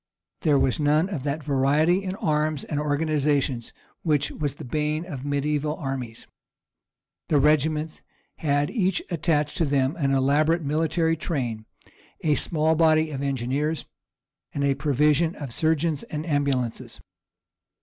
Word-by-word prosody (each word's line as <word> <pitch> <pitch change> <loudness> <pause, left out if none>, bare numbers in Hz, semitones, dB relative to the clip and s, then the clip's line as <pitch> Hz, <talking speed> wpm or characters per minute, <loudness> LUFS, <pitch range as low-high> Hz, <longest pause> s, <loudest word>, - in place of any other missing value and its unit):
There 150 -3 +3
was 130 0 +1
none 150 +4 +2
of 170 -9 -3
that 145 +2 -2
variety 150 +6 +2
in 190 0 -3
arms 155 -3 0
and 145 - -3
organizations 145 -4 0 0.3
which 150 -4 +1
was 145 -3 -3
the - - -9
bane 150 +5 -1
of 145 -7 -6
mediæval 145 +3 -1
armies. 130 -6 -5 1.0
The 150 - +3
regiments 155 +2 +1 0.4
had 145 -1 0
each 190 -6 0
attached 150 -3 0
to 165 - +2
them 140 +1 +1
an 140 -5 +1
elaborate 150 +5 +2
military 160 +2 +1
train, 120 -9 -3 0.5
a 150 - +2
small 155 +1 +1
body 160 -1 +3
of 135 -2 -4
engineers, 140 +3 -1 0.7
and 140 - 0
a 140 -1 +3
provision 150 +4 +2
of 140 -5 -6
surgeons 160 0 +1
and 155 0 -5
ambulances. 140 -6 -1
150 Hz, 135 wpm, -25 LUFS, 140-160 Hz, 1.0 s, There